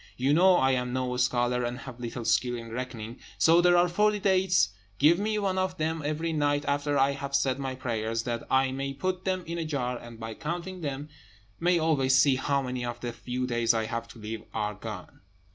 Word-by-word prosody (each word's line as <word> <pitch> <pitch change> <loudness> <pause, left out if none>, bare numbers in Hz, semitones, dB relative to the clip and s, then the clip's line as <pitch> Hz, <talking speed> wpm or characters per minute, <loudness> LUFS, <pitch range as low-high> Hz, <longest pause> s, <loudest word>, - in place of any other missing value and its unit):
You 135 +3 +2
know 180 +3 +6
I 135 -4 +3
am 125 -1 -1
no 130 -1 -1
scholar, 125 0 +1
and 120 +1 -2
have 130 -2 -9
little 120 0 -5
skill 120 +1 +2
in 115 -1 -7
reckoning; 120 -2 -6 0.2
so 165 +2 +5
there 175 0 +5
are 175 +1 +5
forty 210 +4 +2
dates: 190 - +3 0.3
give 160 +5 +5
me 215 +1 0
one 195 -2 0
of 185 0 -1
them 160 +1 -1
every 155 +3 -1
night 145 -1 +1
after 145 0 0
I 135 +1 +4
have 140 0 -4
said 135 -1 +1
my 135 -1 -3
prayers, 115 -3 -2
that 120 -1 -2
I 130 0 +3
may 135 +1 -3
put 185 +4 -2
them 185 -1 0
in 170 +1 -4
a - - -1
jar, 125 -6 -2
and, 120 -1 -11
by 110 0 -5
counting 175 +6 -5
them 145 0 -4 0.5
may 175 +1 +3
always 145 -5 +2
see 135 0 +5
how 140 +1 0
many 125 -1 -3
of 120 0 -4
the 120 -1 -4
few 125 +2 -3
days 120 -1 +2
I 110 -1 0
have 115 +1 -4
to 115 - -13
live 110 0 -5
are 105 -1 -1
gone." - - -9
135 Hz, 220 wpm, -28 LUFS, 120-165 Hz, 0.5 s, know